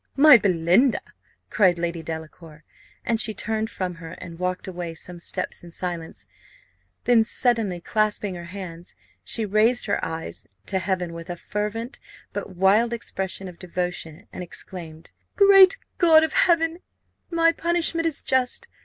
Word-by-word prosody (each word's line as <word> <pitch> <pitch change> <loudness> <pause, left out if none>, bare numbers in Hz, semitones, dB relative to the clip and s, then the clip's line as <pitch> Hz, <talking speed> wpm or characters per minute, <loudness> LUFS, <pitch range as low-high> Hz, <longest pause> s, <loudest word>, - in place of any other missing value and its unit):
my 295 0 +9
Belinda!" 195 +4 +3 0.5
cried 185 -4 +4
Lady 170 -1 -3
Delacour, 160 -1 -9 0.4
and 230 -1 +2
she 215 -1 +1
turned 220 +1 -2
from 185 -5 -4
her, 165 - -8
and 165 0 -10
walked 180 +1 -3
away 175 -3 -5
some 175 +1 -8
steps - - -4
in 170 - -12
silence; 170 -2 -5 0.8
then 240 -2 +5
suddenly 225 -6 0
clasping 210 +1 0
her 175 -1 -8
hands, 175 -2 -9 0.3
she 225 - +1
raised 215 +4 +2
her 205 - -1
eyes 160 0 -5 0.2
to 190 - -1
heaven 180 -2 -2
with 165 +1 -9
a 175 - -3
fervent 210 +6 -4 0.3
but 185 - -6
wild 205 +6 +3
expression 190 -4 -5
of 180 -2 -11
devotion, 180 -3 -5
and - - -6
exclaimed, 170 -2 -9 0.2
"Great 390 -2 +7 0.2
God 320 -3 +6
of 320 - -1
heaven, 340 -8 +3 0.5
my 330 -1 +3
punishment 335 0 +1
is 315 - -2
just! 255 -1 0
190 Hz, 145 wpm, -24 LUFS, 175-240 Hz, 0.8 s, my